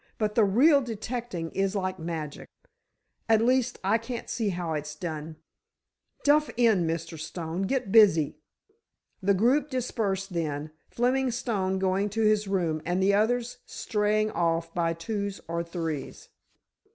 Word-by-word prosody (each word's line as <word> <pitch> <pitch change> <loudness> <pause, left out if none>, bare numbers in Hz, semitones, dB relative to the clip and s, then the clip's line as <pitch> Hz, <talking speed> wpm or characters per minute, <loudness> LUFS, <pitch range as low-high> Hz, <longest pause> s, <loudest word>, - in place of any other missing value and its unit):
But 210 -1 0
the 225 - +4
real 275 +9 +5
detecting 230 -7 -4
is 195 +1 0
like 185 -1 -2
magic. 160 -3 -5 0.8
At 220 -1 +5
least, 250 +1 +2
I 210 +4 +3
can't 230 +1 -6
see 225 -2 0
how 175 -3 -3
it's 150 0 -4
done. 155 -1 -5 0.9
Duff 300 +1 +4
in, 220 -8 +4
Mr. 165 0 -4
Stone. 170 +4 -4
Get 260 -6 -1
busy." 165 -9 +5 0.8
The 200 +1 +3
group 255 +9 +2
dispersed 210 -7 -2
then, 155 -2 -3 0.2
Fleming 255 +2 +1
Stone 205 -6 -1
going 190 +2 +1
to 225 +2 -1
his 215 -1 +3
room 170 -5 0
and 175 +2 -1
the 195 +1 +3
others 235 +4 +1
straying 215 0 0
off 165 0 0
by 165 -1 +1
twos 200 +4 -4
or 170 +1 -2
threes. 165 -4 -5
195 Hz, 140 wpm, -27 LUFS, 165-225 Hz, 0.9 s, real